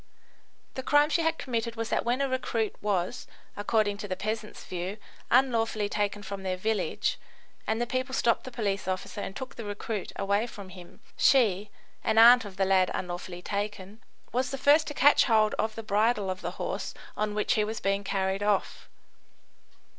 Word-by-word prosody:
The 260 Hz, -, -4 dB
crime 290 Hz, +3 st, +3 dB
she 335 Hz, -, +2 dB
had 325 Hz, 0 st, +1 dB
committed 230 Hz, -2 st, -3 dB
was 225 Hz, 0 st, -3 dB
that -, -, +1 dB
when 245 Hz, +3 st, 0 dB
a 275 Hz, -, +2 dB
recruit 240 Hz, -4 st, -1 dB
was, 195 Hz, -4 st, -1 dB, 0.3 s
according 205 Hz, 0 st, +1 dB
to 205 Hz, -, -5 dB
the 185 Hz, -, -2 dB
peasants' 215 Hz, +2 st, -4 dB
view, 185 Hz, +3 st, -4 dB, 0.3 s
unlawfully 230 Hz, -4 st, +2 dB
taken 205 Hz, 0 st, -1 dB
from 200 Hz, -1 st, -6 dB
their 185 Hz, -1 st, -2 dB
village, 215 Hz, +3 st, -1 dB, 0.5 s
and 220 Hz, +1 st, 0 dB
the 240 Hz, -, +1 dB
people 255 Hz, +2 st, -2 dB
stopped 235 Hz, -3 st, +2 dB
the 255 Hz, -, -8 dB
police 200 Hz, -5 st, -2 dB
officer 185 Hz, +2 st, -3 dB
and 195 Hz, -, -6 dB
took 260 Hz, +1 st, -6 dB
the 230 Hz, -, -7 dB
recruit 205 Hz, 0 st, -4 dB
away 200 Hz, +3 st, 0 dB
from 200 Hz, -5 st, -10 dB
him, 180 Hz, +2 st, -13 dB, 0.2 s
she 210 Hz, -7 st, +3 dB, 0.3 s
(an 220 Hz, -, +1 dB
aunt 240 Hz, +1 st, +8 dB
of 195 Hz, -2 st, -10 dB
the 195 Hz, -, +2 dB
lad 190 Hz, -1 st, +3 dB
unlawfully 175 Hz, 0 st, -5 dB
taken) 205 Hz, +1 st, -4 dB, 0.3 s
was 255 Hz, +1 st, 0 dB
the 275 Hz, -, -4 dB
first 295 Hz, +3 st, +4 dB
to 295 Hz, -, -5 dB
catch 290 Hz, +2 st, +6 dB
hold 220 Hz, -3 st, +3 dB
of 220 Hz, 0 st, 0 dB
the 225 Hz, -, -6 dB
bridle 210 Hz, -1 st, +1 dB
of 185 Hz, +1 st, -6 dB
the -, -, -5 dB
horse -, -, -4 dB, 0.2 s
on 210 Hz, 0 st, -1 dB
which 210 Hz, -, +1 dB
he 215 Hz, -, +2 dB
was 220 Hz, +1 st, -3 dB
being 195 Hz, +1 st, 0 dB
carried 195 Hz, 0 st, -1 dB
off. 205 Hz, -1 st, -1 dB
215 Hz, 185 wpm, -28 LUFS, 195-235 Hz, 0.5 s, aunt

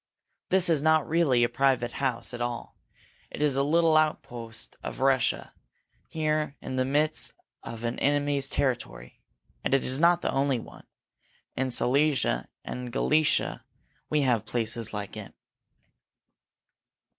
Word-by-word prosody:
This 190 Hz, -1 st, +3 dB
is 160 Hz, -4 st, +2 dB
not 160 Hz, -1 st, +3 dB
really 150 Hz, -7 st, +3 dB
a -, -, +4 dB
private 130 Hz, -2 st, +1 dB
house 130 Hz, -2 st, -2 dB
at 120 Hz, -, -6 dB
all 120 Hz, -1 st, -4 dB, 0.5 s
it -, -, -8 dB
is 145 Hz, -2 st, +2 dB
a 135 Hz, -, +2 dB
little 160 Hz, +3 st, +3 dB
outpost 125 Hz, -7 st, -2 dB
of -, -, -6 dB
Russia, 135 Hz, 0 st, +1 dB, 0.5 s
here 155 Hz, -2 st, -1 dB
in 130 Hz, -, -6 dB
the 130 Hz, 0 st, +1 dB
midst 150 Hz, +3 st, +1 dB, 0.3 s
of 115 Hz, 0 st, -8 dB
an 120 Hz, 0 st, -2 dB
enemy's 145 Hz, -1 st, +1 dB
country. 60 Hz, -, -3 dB, 0.4 s
And -, -, +2 dB
it 135 Hz, -, +1 dB
is 130 Hz, +2 st, +2 dB
not 170 Hz, +1 st, +4 dB
the -, -, +1 dB
only 135 Hz, -1 st, +1 dB
one. 115 Hz, -, -11 dB, 0.7 s
In 130 Hz, 0 st, -1 dB
Silesia 130 Hz, -, +1 dB, 0.2 s
and -, -, -5 dB
in -, -, -6 dB
Galicia 150 Hz, +5 st, +1 dB, 0.5 s
we 150 Hz, -1 st, +2 dB
have 120 Hz, -5 st, +2 dB
places 115 Hz, -1 st, -1 dB
like 105 Hz, -2 st, -6 dB
it." -, -, -9 dB
135 Hz, 145 wpm, -27 LUFS, 120-150 Hz, 0.7 s, a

